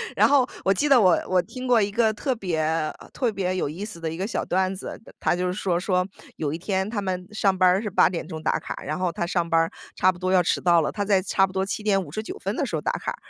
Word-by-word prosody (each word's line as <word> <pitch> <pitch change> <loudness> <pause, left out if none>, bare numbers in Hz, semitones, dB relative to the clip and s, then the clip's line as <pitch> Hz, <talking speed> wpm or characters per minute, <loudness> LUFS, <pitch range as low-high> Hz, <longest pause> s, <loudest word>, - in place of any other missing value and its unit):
然 - - +5
后 275 -3 +4 0.2
我 195 - +3
记 285 +10 +1
得 270 -4 +6
我 185 -4 +5
我 185 -1 +3
听 255 +7 -8
过 245 -3 +4
一 200 - +1
个 220 +1 +2
特 255 +4 -2
别， 180 -7 -2
呃， 155 0 0 0.2
特 245 -4 0
别 185 -2 -2
有 185 - -1
意 165 +8 -6
思 210 -5 -8
的 165 -1 -3
一 - - -5
个 190 +4 -3
小 230 - -2
段 190 +1 +1
子， 185 - -8 0.2
他 - - +1
他 - - +3
就 180 0 -1
说， 180 -2 -1
说- 180 0 0 0.3
有 150 -2 -2
一 165 - -4
天 190 +1 -1
他 215 -3 -2
们 185 -2 -3
上 195 -3 +1
班 185 - +5
儿 185 +3 +3
是 215 - -3
8 - - +4
点 170 -3 -4
钟 160 -3 -6
打 - - +1
卡， - - -6
然 155 - -3
后 180 -2 0
他 175 -3 -2
上 170 -1 -1
班 165 0 +4
儿 165 - -1 0.2
差 185 - +4
不 175 - -13
多 185 0 -1
要 185 -1 +5
迟 - - 0
到 170 -2 +4
了， 150 - -1
他 205 - -2
在 200 -1 +3
差 195 0 +2
不 - - -11
多 190 0 -1
7:59 210 - -2
分 - - -3
的 - - -1
时 - - -3
候 - - -2
打 - - 0
卡， - - -4
185 Hz, 300 characters per minute, -24 LUFS, 175-210 Hz, 0.3 s, 得